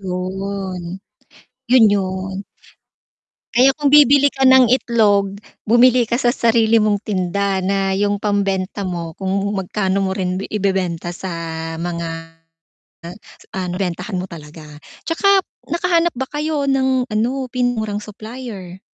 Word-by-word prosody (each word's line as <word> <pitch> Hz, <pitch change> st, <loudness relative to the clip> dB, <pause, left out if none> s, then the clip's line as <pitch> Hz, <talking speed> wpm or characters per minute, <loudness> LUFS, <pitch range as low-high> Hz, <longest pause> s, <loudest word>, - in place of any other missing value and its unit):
'Yon. 190 Hz, 0 st, -4 dB, 0.9 s
'Yun, 250 Hz, -2 st, +6 dB
'yon. 190 Hz, 0 st, -2 dB, 1.1 s
Kaya 255 Hz, +3 st, +6 dB
kung 285 Hz, -2 st, +2 dB
bibili 285 Hz, -1 st, +7 dB
ka 270 Hz, -, -4 dB
ng 260 Hz, -1 st, +7 dB
itlog, 205 Hz, -5 st, +2 dB, 0.3 s
bumili 245 Hz, +2 st, +5 dB
ka 235 Hz, -, 0 dB
sa 245 Hz, -2 st, +2 dB
sarili 230 Hz, -2 st, +3 dB
mong 210 Hz, -1 st, +2 dB
tinda 195 Hz, -1 st, -1 dB
na 195 Hz, 0 st, 0 dB
yung 205 Hz, +1 st, 0 dB
pambenta 200 Hz, -1 st, -1 dB
mo 170 Hz, -3 st, -4 dB
kung 190 Hz, +1 st, -4 dB, 0.2 s
magkano 195 Hz, 0 st, -1 dB
mo 190 Hz, -, -1 dB
rin 185 Hz, -1 st, -2 dB
bi -, -, -5 dB
ibebenta 185 Hz, -4 st, -1 dB
sa 190 Hz, +2 st, -6 dB, 0.5 s
mga, 170 Hz, 0 st, -3 dB, 1.5 s
ah, 185 Hz, -, -2 dB
nabentahan 180 Hz, +1 st, -3 dB
mo 185 Hz, -, -4 dB
talaga. 155 Hz, -1 st, -11 dB, 0.4 s
'Tsaka 390 Hz, +4 st, +3 dB, 0.3 s
nakahanap 340 Hz, -1 st, +1 dB
ba 260 Hz, +1 st, -4 dB
kayo 300 Hz, -1 st, -2 dB
ng 260 Hz, -2 st, +1 dB
ano, 215 Hz, +3 st, 0 dB, 0.2 s
pinakamurang 235 Hz, -5 st, -1 dB
supplier? 215 Hz, -4 st, -9 dB
200 Hz, 125 wpm, -19 LUFS, 190-245 Hz, 1.5 s, bibili